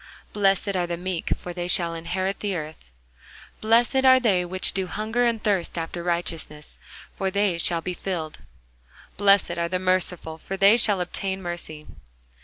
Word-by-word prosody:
Blessed 195 Hz, 0 st, +1 dB
are 175 Hz, -1 st, 0 dB
the 170 Hz, 0 st, -3 dB
meek: 180 Hz, -1 st, -4 dB
for 175 Hz, -, -8 dB
they 175 Hz, 0 st, -4 dB
shall 170 Hz, -2 st, +2 dB
inherit 185 Hz, +4 st, -3 dB
the 200 Hz, -2 st, -2 dB
earth. 155 Hz, -, -7 dB, 0.7 s
Blessed 230 Hz, +4 st, +3 dB
are 260 Hz, 0 st, +7 dB
they 200 Hz, -8 st, +2 dB
which 185 Hz, +1 st, 0 dB
do 190 Hz, -1 st, -2 dB
hunger 220 Hz, +5 st, 0 dB
and 230 Hz, -2 st, -2 dB
thirst 195 Hz, -5 st, 0 dB
after 165 Hz, +1 st, -4 dB
righteousness: 170 Hz, -3 st, -3 dB, 0.4 s
for 195 Hz, -1 st, -1 dB
they 200 Hz, -3 st, 0 dB
shall 170 Hz, 0 st, +2 dB
be 180 Hz, -, -4 dB
filled. 170 Hz, -4 st, -5 dB, 0.8 s
Blessed 195 Hz, -3 st, +3 dB
are 170 Hz, 0 st, -1 dB
the 185 Hz, -, 0 dB
merciful: 180 Hz, -3 st, -1 dB
for 195 Hz, +4 st, -6 dB
they 200 Hz, +3 st, +6 dB
shall 210 Hz, -5 st, +4 dB
obtain 190 Hz, +2 st, -3 dB
mercy. 175 Hz, -4 st, -7 dB
185 Hz, 165 wpm, -24 LUFS, 170-200 Hz, 0.8 s, are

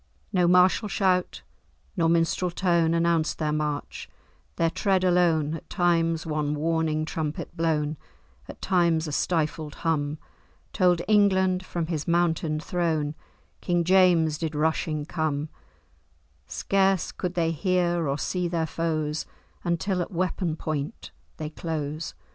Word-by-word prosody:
"No 180 Hz, -1 st, +3 dB
martial 180 Hz, +4 st, +4 dB
shout, 185 Hz, -3 st, 0 dB, 0.5 s
nor 165 Hz, -4 st, +2 dB
minstrel 170 Hz, +2 st, +1 dB
tone, 170 Hz, -2 st, +2 dB
Announced 170 Hz, -1 st, +1 dB
their 155 Hz, -1 st, -1 dB
march; 150 Hz, -1 st, -3 dB, 0.5 s
their 165 Hz, -1 st, +1 dB
tread 190 Hz, 0 st, +1 dB
alone, 170 Hz, -4 st, +3 dB
At 165 Hz, -, -8 dB
times 165 Hz, -2 st, +1 dB
one 150 Hz, -2 st, -1 dB
warning 155 Hz, 0 st, 0 dB
trumpet 155 Hz, -1 st, -4 dB
blown, 155 Hz, -2 st, 0 dB, 0.5 s
At -, -, -11 dB
times 170 Hz, -4 st, +2 dB
a -, -, -4 dB
stifled 155 Hz, -1 st, -1 dB
hum, 150 Hz, -2 st, 0 dB, 0.6 s
Told 180 Hz, -3 st, +3 dB
England, 190 Hz, -3 st, +3 dB
from 175 Hz, -2 st, -3 dB
his 160 Hz, -2 st, -3 dB
mountain 165 Hz, -2 st, +1 dB
throne, 160 Hz, -3 st, -1 dB, 0.5 s
King 175 Hz, -1 st, +1 dB
James 170 Hz, -4 st, +4 dB
did 160 Hz, -2 st, -3 dB
rushing 155 Hz, 0 st, 0 dB
come: 155 Hz, -2 st, -2 dB, 1.0 s
Scarce 195 Hz, -2 st, +1 dB
could 180 Hz, -1 st, -4 dB
they 165 Hz, -2 st, +1 dB
hear 175 Hz, -1 st, 0 dB
or 140 Hz, +1 st, 0 dB
see 180 Hz, +3 st, -1 dB
their 170 Hz, -2 st, -1 dB
foes 155 Hz, -2 st, -2 dB, 0.4 s
Until 180 Hz, +2 st, 0 dB
at 175 Hz, -, -3 dB
weapon 180 Hz, -2 st, -1 dB
point 145 Hz, -, -4 dB, 0.3 s
they 155 Hz, -1 st, -5 dB
close." 155 Hz, -1 st, -4 dB
165 Hz, 130 wpm, -26 LUFS, 155-180 Hz, 1.0 s, martial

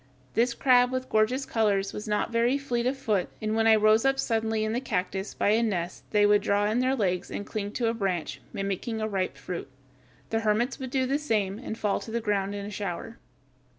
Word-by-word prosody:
This 235 Hz, +1 st, +2 dB
crab 250 Hz, -1 st, +4 dB
with 255 Hz, 0 st, -3 dB
gorgeous 235 Hz, +5 st, +2 dB
colors 200 Hz, -3 st, +1 dB
was 210 Hz, -, -6 dB
not 210 Hz, +2 st, 0 dB
very 235 Hz, +3 st, +2 dB
fleet 245 Hz, -4 st, -1 dB
of 265 Hz, +2 st, 0 dB
foot, 210 Hz, -8 st, 0 dB
and 215 Hz, 0 st, -1 dB
when 225 Hz, 0 st, +3 dB
I 220 Hz, -, +7 dB
rose 215 Hz, +1 st, +4 dB
up 270 Hz, 0 st, +2 dB
suddenly 225 Hz, -3 st, 0 dB
in 215 Hz, 0 st, -1 dB
the 245 Hz, -, -1 dB
cactus 190 Hz, -4 st, -3 dB
by -, -, +1 dB
a 220 Hz, +2 st, +4 dB
nest 185 Hz, -6 st, -2 dB
they 210 Hz, -1 st, +4 dB
would 205 Hz, 0 st, +5 dB
draw 205 Hz, 0 st, +2 dB
in 220 Hz, +3 st, +1 dB
their 260 Hz, +1 st, +2 dB
legs 185 Hz, -6 st, -1 dB
and 205 Hz, -, -5 dB
cling 205 Hz, -2 st, -4 dB
to 240 Hz, -, -1 dB
a 225 Hz, -, +1 dB
branch, 190 Hz, -7 st, -2 dB
mimicking 200 Hz, +3 st, -3 dB
ripe 200 Hz, -4 st, -2 dB
fruit. 180 Hz, -5 st, -6 dB, 0.6 s
The 225 Hz, -, +2 dB
hermits 225 Hz, +5 st, 0 dB
would 260 Hz, -1 st, -5 dB
do 260 Hz, 0 st, +1 dB
the 275 Hz, +3 st, 0 dB
same, 210 Hz, -8 st, -1 dB
and 225 Hz, -3 st, -6 dB
fall 205 Hz, -3 st, 0 dB
to -, -, -9 dB
the 235 Hz, +1 st, -1 dB
ground 205 Hz, -2 st, -1 dB
in 200 Hz, 0 st, -5 dB
a 205 Hz, -, -6 dB
shower. 205 Hz, +3 st, -5 dB
220 Hz, 220 wpm, -27 LUFS, 205-240 Hz, 0.6 s, I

